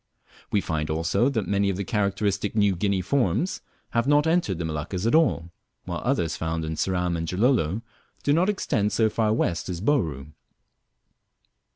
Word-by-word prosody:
We 100 - +2
find, 80 -2 -2
also, 80 - +1
that 115 -7 -1
many 100 0 +1
very 100 +1 -2
characteristic 100 0 -1
New 100 -3 +3
Guinea 100 +1 0
forms 120 - 0 0.3
lave 115 +2 +1
not 145 +1 +4
entered 160 - +1
the 85 - -3
Moluccas 80 +5 -3
at 115 - +2
all, 125 - +2 0.3
while - - -4
others 80 -2 0
found 80 0 -2
in 80 - -3
Ceram 90 0 0
and 85 0 -3
Gilolo 105 - +1 0.4
do 145 - +3
not 175 +6 +3
extend 120 - 0
so 110 -2 +2
far 110 -1 +1
west 90 -6 0
as 90 -2 -3
Bouru. 80 - 0
100 Hz, 165 wpm, -25 LUFS, 85-115 Hz, 0.4 s, not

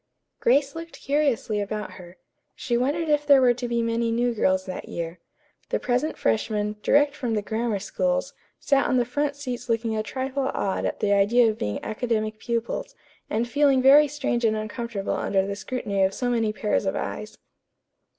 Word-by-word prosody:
Grace 275 +3 +3
looked 330 0 -8
curiously 275 -7 0
about 210 +1 -4
her. 180 -1 -13 0.4
She 240 - -2
wondered 290 +7 0
if 295 -1 +2
there 285 -2 +6
were 250 -2 +5
to 245 0 -5
be 235 -1 0
many 230 0 0
new 240 +1 +1
girls 190 -3 +1
that 185 - -7
year. 170 0 -5 0.5
The - - +1
present 250 +5 -1
freshmen, 210 - 0
direct 290 +3 +3
from 245 -6 -2
the 210 - -1
Grammar 225 0 -1
Schools, - - -1 0.3
sat 275 -1 +2
on 255 - +2
the 245 - +2
front 285 +4 -1
seats 250 -3 -6
looking 225 -1 0
a 215 - 0
trifle 265 +4 -2
awed 195 - -1
at - - -3
the 205 -1 +2
idea 220 +4 +4
of 215 - -10
being 105 0 -2
academic 215 -1 -2
pupils, 235 - -3 0.3
and 230 +2 0
feeling 280 +1 +3
very 280 +3 +7
strange 270 -4 -2
and 220 -1 +2
uncomfortable 215 -1 -4
under 195 -1 0
the 200 0 -3
scrutiny 205 -2 -3
of 190 0 +2
so 245 -1 -1
many 225 -3 +1
pairs 215 0 -1
of - - 0
eyes. - - -5
235 Hz, 185 wpm, -25 LUFS, 210-270 Hz, 0.5 s, very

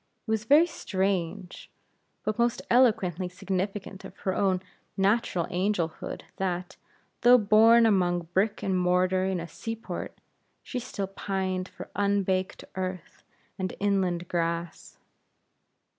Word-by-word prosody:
It - - -2
was 220 0 0
very 295 +6 +6
strange, 190 - -3 0.5
but 215 +2 -2
most 240 +1 +1
eloquently 210 -8 +3
significant 195 +1 -4
of 190 - -11
her 190 - +1
own 190 -2 +1 0.3
natural 195 -3 +2
angelhood 180 -3 -2
that, 180 -1 -2 0.5
though 245 +1 +8
born 225 +2 +6
among 180 -5 +2
brick 205 +3 +1
and 190 -1 0
mortar 180 +1 +2
in 190 -2 -1
a 170 - -5
sea 225 +6 -5
port, 225 - -7 0.5
she 250 - -4
still 200 -4 -4
pined 190 -1 -3
for - - -10
unbaked 195 -2 0
earth 185 -1 -5 0.4
and 185 -1 -3
inland 185 -4 0
grass. 170 -1 -3
190 Hz, 125 wpm, -27 LUFS, 180-210 Hz, 0.5 s, though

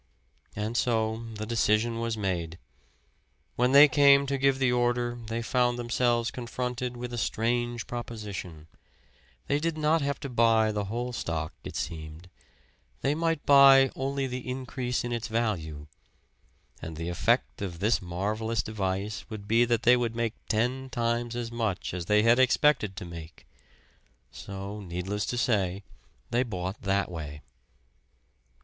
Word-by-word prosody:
And 110 +3 -3
so 115 -2 0
the 105 0 -4
decision 115 0 +1
was 115 -1 -2
made. 85 -5 -2 1.0
When 125 +1 +2
they 140 +2 +9
came 140 0 +5
to 140 0 -2
give 135 0 +3
the 130 -2 +2
order 120 0 0
they 115 +1 -3
found 120 0 +1
themselves 120 -1 +1
confronted 125 0 -4
with 120 0 -6
a 120 - -2
strange 120 +2 -1
proposition; 105 -9 -6 0.8
they 145 - +1
did 165 0 -2
not 155 +1 +2
have 140 0 -2
to 140 - -4
buy 115 -2 +3
the 105 -1 -2
whole 120 +4 -3
stock, 80 -7 -3
it - - -8
seemed 80 +1 -6 0.7
they 140 - +1
might 165 -1 -1
buy 135 -1 +7
only 135 +1 -2
the 125 -1 -5
increase 125 -1 -3
in 120 - -4
its 115 -1 -3
value. 90 -11 -2 1.0
And 80 -1 -7
the 85 +1 -4
effect 85 - 0
of 90 -4 -4
this 105 +6 +1
marvelous 105 +5 -2
device 100 0 -3
would 105 -3 -8
be 115 +3 +4
that 120 -2 0
they 125 +1 +7
would 120 -2 -1
make 115 -1 -1 0.2
ten 125 +4 0
times 120 -1 -1
as 120 -1 -4
much 110 -7 -2
as 90 -1 -4
they 105 0 +4
had 115 +2 +5
expected 130 -5 +3
to 90 - -6
make! 85 -1 -10 0.9
So, 100 +1 -7
needless 95 +3 -3
to 125 - -2
say, 100 -6 0 0.5
they 120 - +2
bought 95 -5 -4
that 95 -2 0
way. 75 -4 -7
115 Hz, 150 wpm, -28 LUFS, 100-125 Hz, 1.0 s, they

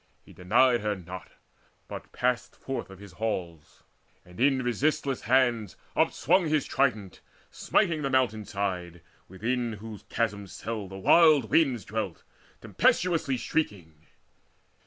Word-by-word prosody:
He - - -15
denied 120 +7 +3
her 105 -1 -1
not, 90 -1 -10 0.5
but - - -8
passed 125 -1 -1
Forth 135 -6 -5
of 95 - -11
his 100 0 -12
halls, 90 -6 -5 0.4
and 90 +3 -15
in 135 0 +3
resistless 135 +2 0
hands 120 -4 +2 0.2
Upswung 175 +6 +2
his 150 -2 +1
trident, 110 -9 -1 0.3
smiting 170 -7 +1
the 135 - -1
mountain 125 -5 +1
side 90 -4 -4 0.2
Within 115 +5 -2
whose 105 0 -9
chasm 105 -3 -1
cell 110 +1 -5
the 95 +1 -9
wild 145 - +5
winds 130 - +2
dwelt 105 -4 -4 0.4
Tempestuously 165 -7 +1
shrieking. 85 - -3
110 Hz, 125 wpm, -28 LUFS, 95-130 Hz, 0.5 s, wild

